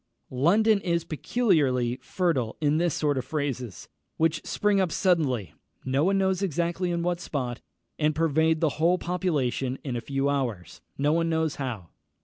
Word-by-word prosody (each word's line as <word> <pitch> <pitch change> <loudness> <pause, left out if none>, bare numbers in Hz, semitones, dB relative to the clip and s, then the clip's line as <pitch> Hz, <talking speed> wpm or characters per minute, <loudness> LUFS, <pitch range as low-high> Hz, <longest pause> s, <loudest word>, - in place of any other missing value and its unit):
London 200 - +3
is 170 -3 0
peculiarly 145 - +1
fertile 140 -9 -1
in 150 0 +2
this 170 -1 +1
sort 145 -3 +1
of - - -3
phrases, 130 - -4 0.3
which 160 0 +1
spring 205 -1 +1
up 180 -3 0
suddenly, 140 - +1 0.3
no 135 +2 +1
one 195 +3 +2
knows 190 -1 +1
exactly 175 0 -1
in 170 -1 -1
what 175 0 0
spot, 125 -7 -4 0.4
and 155 0 +2
pervade 160 0 +2
the 160 - +3
whole 170 +3 +4
population 145 -8 -1
in 130 -4 -3
a 120 - -2
few 135 +1 -1
hours, 120 - -2 0.2
no 145 +2 +2
one 165 0 +1
knows 160 -2 0
how. 115 -11 -5
155 Hz, 160 wpm, -26 LUFS, 130-175 Hz, 0.4 s, whole